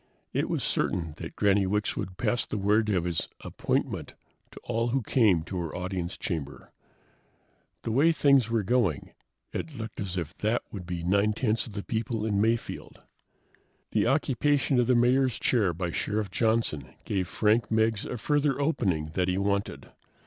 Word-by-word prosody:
It - - 0
was - - -1
certain 80 -3 -1
that - - -7
Granny 100 -1 +3
Wicks 105 +2 0
would 90 -1 -5
pass 120 +2 0
the - - -3
word 105 +2 +2
of 95 -5 +1
his 85 -2 -1
"appointment" - - -2 0.3
to - - -12
all 115 0 -1
who 125 +1 0
came 100 -8 +3
to 90 +2 -4
her 85 -3 -4
audience 90 -1 -3
chamber. 75 -6 -5 1.1
The 115 - -2
way 145 +8 +4
things 140 -7 +4
were 115 -2 +1
going, 100 - +1 0.4
it 155 -4 -5
looked 110 -1 -6
as 95 -2 -3
if 85 +1 -4
that 110 +3 0
would 90 -4 -7
be 90 -2 -4
nine 100 +4 +2
tenths 110 0 0
of 110 - -10
the 100 -1 -4
people 110 -1 -2
in 100 -2 +1
Mayfield. 115 +1 -2 0.9
The - - +2
occupation 140 0 +2
of 120 - +2
the 125 - +4
Mayor's 125 +1 +3
chair 105 -8 +2
by 85 +1 -3
Sheriff 105 +4 -2
Johnson 110 - 0
gave 95 -3 -1
Frank 110 +4 +2
Meggs 110 -1 +2
a 125 - -4
further 145 +3 +1
opening 95 - 0
that 90 0 +1
he 90 0 0
wanted. 100 +1 -2
105 Hz, 170 wpm, -28 LUFS, 95-120 Hz, 1.1 s, way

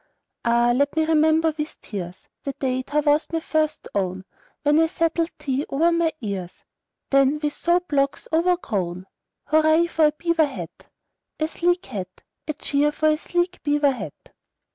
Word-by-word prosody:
Ah, 235 +1 +3
let 285 +3 +1
me 320 0 +2
remember 315 0 +3
with 300 +1 -4
tears 185 -4 -7
The 275 - -4
day 260 -1 -1
thou 295 +3 0
wast 295 +1 +2
first 315 -1 -1
my 200 - +2
own, 185 0 -5 0.4
When 295 +1 +4
I 325 - +4
settled 330 -1 0
thee 270 0 -1
over 325 +5 +2
my 335 -1 +2
ears, 195 -5 -5 0.5
Then 275 +1 +4
with 295 -1 -2
soap 355 +1 0
locks 275 -1 0
overgrown. 210 - 0 0.5
"Hurra 315 +2 +4
for 320 -2 +2
a - - +1
beaver 325 0 +1
hat, 275 - -9 0.5
A 310 - +1
sleek 350 +2 0
hat! 185 -2 -7 0.2
A 305 - -1
cheer 295 0 +1
for 310 +1 +1
a 305 - +2
sleek 350 +1 -1
beaver 290 -1 +2
hat!" 255 - -8
300 Hz, 165 wpm, -23 LUFS, 265-325 Hz, 0.5 s, When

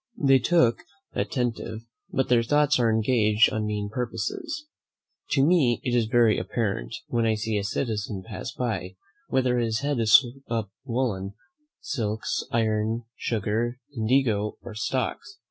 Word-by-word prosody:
They 135 - +5
look 125 -10 +4 0.3
attentive, 120 -3 -2 0.3
but 135 - 0
their 120 -1 +4
thoughts 145 +3 +3
are 115 -2 +3
engaged 110 -1 +3
on 110 -1 -1
mean 105 -1 -3
purposes. 305 - -3 0.7
To 135 -1 +4
me 145 -9 +3
it 125 - -1
is 120 -2 +3
very 115 -1 +4
apparent, 100 - -2
when 115 -1 0
I 110 - +2
see 110 0 -2
a - - -3
citizen 105 -2 -2
pass 110 +1 -6
by, 100 -7 -3 0.3
whether 125 -2 +1
his 115 +1 0
head 140 -2 0
is 115 +4 +7 0.2
upon 115 -4 -2
woollen, 115 -6 -2 0.5
silks, 110 -5 -2
iron, 110 0 0
sugar, 115 +2 -1 0.2
indigo, 110 -3 +1
or 120 - -8
stocks. 130 - -3
115 Hz, 140 wpm, -26 LUFS, 110-130 Hz, 0.7 s, is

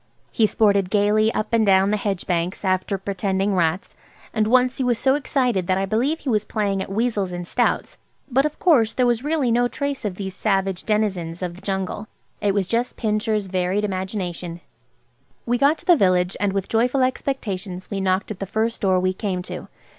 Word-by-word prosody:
He 220 - +3
sported 200 -3 +2
gaily 210 +2 +3
up 215 - -2
and 230 -1 +4
down 195 -1 +4
the - - +2
hedge 200 -3 -2
banks 180 +2 -2
after 185 +1 0
pretending 195 +1 -1
rats, 170 0 0 0.4
and 215 -1 +1
once 255 +2 +3
he 265 - -1
was 245 -2 +1
so 265 +2 +3
excited 250 -9 0
that 185 - +2
I 195 - 0
believe 250 +10 0
he 280 - -3
was 215 -3 +2
playing 200 -3 -1
at 190 - -6
weasels 210 -3 0
and 175 0 -5
stoats. 245 - 0 0.3
But 270 +1 +2
of 300 0 -2
course 245 -11 +3
there 250 - +2
was 240 0 +1
really 295 -5 +1
no 245 +1 +3
trace 280 +1 -3
of 205 -4 -2
these 190 -1 -5
savage 195 -3 0
denizens 190 -6 -1
of 175 -1 -3
the 185 - -14
jungle. 195 +2 -3 0.3
It 200 -1 +1
was 200 -2 +1
just 235 +6 -1
Pincher's 215 -1 0
varied 185 +2 0
imagination. 185 -3 -4 0.8
We 245 +1 0
got 285 +3 +4
to - - -14
the 350 - +6
village, 185 - +2
and 205 -1 +1
with 195 -1 -2
joyful 250 +4 +2
expectations 205 -9 -3
we 195 -1 -2
knocked 190 +2 0
at 205 - -7
the 195 - -4
first 220 +3 -1
door 190 -3 +3
we 185 0 +1
came 185 -2 -3
to. - - -7
205 Hz, 200 wpm, -22 LUFS, 190-235 Hz, 0.8 s, the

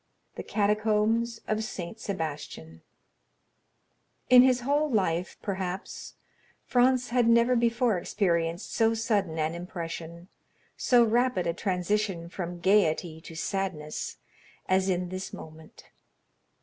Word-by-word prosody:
The - - -6
Catacombs 215 +2 +1
of 215 0 0
Saint 215 0 -6
Sebastian 145 - -6 1.5
In 250 0 +10
his 250 -1 +4
whole 290 +4 +1
life, 185 -6 0
perhaps, 190 -2 -5 0.5
Franz 250 0 +2
had 240 -1 +2
never 235 +2 +4
before 235 -3 +2
experienced 170 -1 -1
so 225 0 +2
sudden 205 -7 0
an 155 +1 0
impression, 170 -1 -7 0.5
so 245 -2 +4
rapid 235 -4 +1
a 170 - 0
transition 185 -1 -1
from 175 -1 -5
gayety 170 -4 +2
to 165 - -11
sadness, 160 -2 -3 0.5
as 190 +1 +2
in 180 -1 -1
this 185 +1 -6
moment. 160 0 -12
195 Hz, 110 wpm, -28 LUFS, 170-230 Hz, 1.5 s, In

